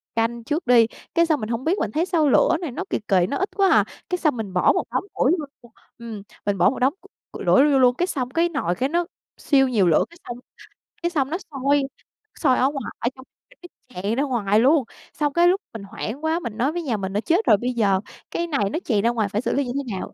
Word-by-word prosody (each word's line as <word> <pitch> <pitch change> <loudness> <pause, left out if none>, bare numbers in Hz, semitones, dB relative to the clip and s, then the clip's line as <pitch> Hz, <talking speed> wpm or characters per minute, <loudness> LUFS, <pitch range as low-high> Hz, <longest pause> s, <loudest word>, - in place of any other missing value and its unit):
canh 230 +1 -1
trước 300 +4 -3
đi. 235 -2 +6 0.3
Cái 335 0 +4
xong 315 -4 +1
mình 215 - -5
hông 235 +2 -2
biết 360 +7 +1
mình 205 - -2
thấy 320 +9 0
sao 325 -6 +2
lửa 315 - +4
này 325 -7 -4
nó 370 - -4
kì - - -1
kì, 185 -3 +3
nó 280 - -1
ít 385 - -1
quá 390 -2 +3
hà, - - +4 0.2
cái 360 - 0
xong 305 -8 +1
mình 205 -4 -5
bỏ 180 - +4
một - - 0
đống - - -1
củi 270 - +2
vô 360 - +2 0.2
luôn 240 -2 -18 0.3
ừm, 225 -4 -8 0.2
mình 200 -1 0
bỏ 175 - +5
một 265 - -5
đống 260 +3 +2
c - - -28 0.3
củi - - -8
đổ - - +5
nó 290 +2 +5
vô 270 - +4
luôn, 250 -1 +4
cái 355 - 0
xong 255 -8 -3
cái 335 +6 +1
nồi 225 - -1
cái 260 +6 -1
nó 345 +3 0 0.3
siêu 270 -2 +3
nhiều 215 -8 +2
lửa, 160 - +3
cái 340 - -17
xong 240 0 -6 0.6
cái 345 - +1
xong 285 -6 -1
nó 330 - -1
sôi 280 +1 +1 0.6
sôi 260 -5 +3
ở 260 +2 +3
ngoài, 275 -2 -6
ở 235 - 0
trong 260 - -14 0.4
cái 355 - -12 0.3
tràn 210 +3 0
ra 275 - +1
ngoài 215 -7 +1
luôn. 275 +4 +4 0.3
Xong 295 -2 -1
cái 345 +1 +4
lúc 380 +3 +2
mình 225 -3 -7
hoảng 225 +7 -6
quá, 320 +2 +1
mình 230 -10 -6
nói 260 +5 +1
với 345 +2 -3
nhà 240 -8 -1
mình 190 -1 -4
á: 205 - 0
"Chết 345 - +1
rồi, 210 - +5
bây 250 +4 -2
giờ, 200 -5 +2 0.3
cái 340 - -2
này 215 -11 0
nó 325 - -2
chày 215 -5 +1
ra 230 - +2
ngoài 220 -4 -1
phải 210 +1 -1
xử - - -1
lý 280 0 0
như 245 - -4
thế 250 -9 -3
nào?" - - -7
260 Hz, 275 wpm, -23 LUFS, 225-315 Hz, 0.6 s, đi